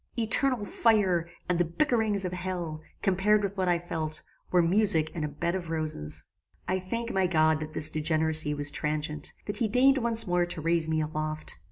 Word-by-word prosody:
Eternal 235 0 +1
fire, 190 -7 +2 0.2
and 180 -1 0
the - - +4
bickerings 215 - 0
of 180 - -3
hell, 175 -4 -4 0.2
compared 205 +3 +2
with 200 0 -3
what 190 -2 -1
I 175 - +3
felt, 160 -2 -3 0.3
were 180 -1 +3
music 175 -3 +4
and 160 - -4
a - - -1
bed 150 +4 -3
of 180 -3 -4
roses. 80 - -1 0.4
"I 185 0 0
thank 230 +6 -4
my 190 -1 +1
God 155 -2 +2
that 155 0 -7
this 155 - -3
degeneracy 155 -1 +2
was 145 0 0
transient, 150 0 -3
that 205 - -3
he 230 - +1
deigned 265 +5 +4
once 230 -2 +3
more 175 -1 +1
to 175 - -3
raise 165 0 0
me 160 0 +1
aloft. 155 0 -3
175 Hz, 190 wpm, -28 LUFS, 155-200 Hz, 0.4 s, the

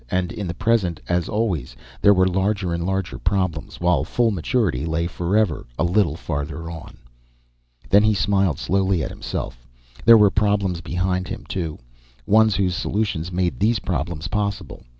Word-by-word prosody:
And 90 0 -1
in 105 -4 -5
the 85 - -4
present, 100 -5 +1
as 90 -1 0
always, 95 - -1 0.3
there 100 - +6
were 95 0 +4
larger 95 -1 0
and 85 +1 -2
larger 95 -1 -2
problems, 90 -4 -2
while 90 0 +2
full 120 -2 +1
maturity 95 - 0
lay 85 +1 -1
forever 90 - 0
a - - +1
little 85 -2 +2
farther 80 +1 -4
on. 80 -2 -10 0.9
Then 100 +11 +5
he 110 0 +3
smiled 95 -6 +1
slowly 95 -3 +1
at - - -4
himself. - - -6 0.4
There 115 +1 +8
were 105 -2 +5
problems 100 -4 +1
behind 90 +2 -1
him, - - -7
too 80 -5 -3 0.5
ones 110 0 +4
whose 95 -2 +1
solutions 95 -4 -2
made 90 -1 -1
these 110 +3 +2
problems 85 -3 -3
possible. 100 0 -3
95 Hz, 160 wpm, -22 LUFS, 85-100 Hz, 0.9 s, There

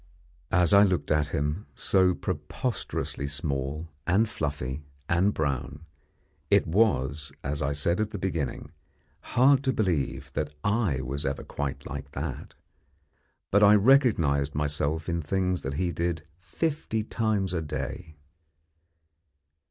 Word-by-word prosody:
As 90 -2 +4
I 100 - +8
looked 95 -4 +2
at 75 -1 +3
him, 75 +3 -2
so 90 +4 +3
preposterously 80 - -3
small, 70 +1 -3 0.2
and 100 +5 +3
fluffy, 70 -7 -3 0.3
and 90 +4 +3
brown, 70 -1 -3 0.6
it - - +4
was, 75 - +1
as 75 0 -2
I 70 +1 0
said 85 +6 0
at 110 -1 0
the - - -5
beginning, 85 -6 -3 0.7
hard 135 +2 +6
to 130 - +2
believe 70 - -1
that 75 -1 -3
I 100 - +1
was 70 +2 -3
ever 70 - -2
quite 70 -1 -4
like 70 0 -7
that. 70 -1 -5 1.0
But 100 - +5
I 105 0 +8
recognised 100 - +4
myself 75 +2 0
in 85 -1 -1
things 90 +3 0
that 70 +1 -4
he 90 +2 0
did 85 0 -2 0.2
fifty 140 - -2
times 105 -4 0
a 85 - 0
day. 80 0 -5
80 Hz, 130 wpm, -27 LUFS, 70-100 Hz, 1.0 s, I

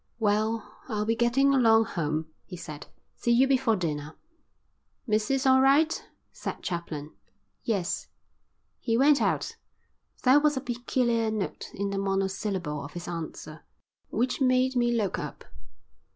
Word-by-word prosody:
"Well, 215 0 0
I'll 210 -2 -1
be 225 +1 +1
getting 245 +4 +3
along 225 -4 +5
home," 155 -4 -2 0.2
he 180 - -9
said. 155 -3 -8 0.3
"See - - -2
you 245 +3 +5
before 260 -4 +3
dinner." 155 -4 -3 0.9
"Missus 230 +4 +1
all 260 0 +6
right?" 290 +4 +3 0.3
said - - -6
Chaplin. 155 -4 -4 0.5
"Yes." 200 -5 -1 0.7
He 230 -1 0
went 285 +2 +5
out. - - 0 0.7
There 260 +3 +6
was 295 -1 +2
a - - -1
peculiar 240 -2 0
note 215 -3 -4
in 200 0 -2
the 195 - -1
monosyllable 195 -5 -2
of 145 - -9
his 175 0 -7
answer 160 -2 -6 0.5
which 245 +4 -1
made 255 0 +3
me 240 -1 +2
look 220 -5 0
up. - - -7
225 Hz, 135 wpm, -27 LUFS, 185-255 Hz, 0.9 s, all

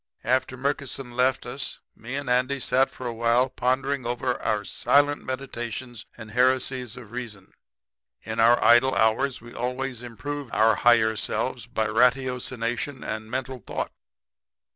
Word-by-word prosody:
"After 130 +1 0
Murkison 135 -1 -3
left 125 +1 +1
us 130 +2 -4 0.2
me 120 +4 -7
and 140 -1 -4
Andy 130 +2 +1
sat 130 +1 +2
a 125 -2 -3
while 120 +3 +2
prepondering 135 +2 0
over 120 +1 -1
our 105 -1 0
silent 145 +5 +2
meditations 120 -3 -5
and 110 0 -10
heresies 125 0 +1
of 115 -4 -11
reason. 115 -6 -7 0.7
In 110 +1 -4
our 115 +2 +6
idle 120 +1 +6
hours 110 +6 +2
we 120 0 -12
always 125 0 -3
improved 140 +3 -6
our 110 +1 +5
higher 110 -1 +4
selves - - -2
by 110 - -1
ratiocination 125 +2 0
and 110 0 -5
mental 130 +1 -3
thought. - - -4
125 Hz, 140 wpm, -25 LUFS, 115-130 Hz, 0.7 s, our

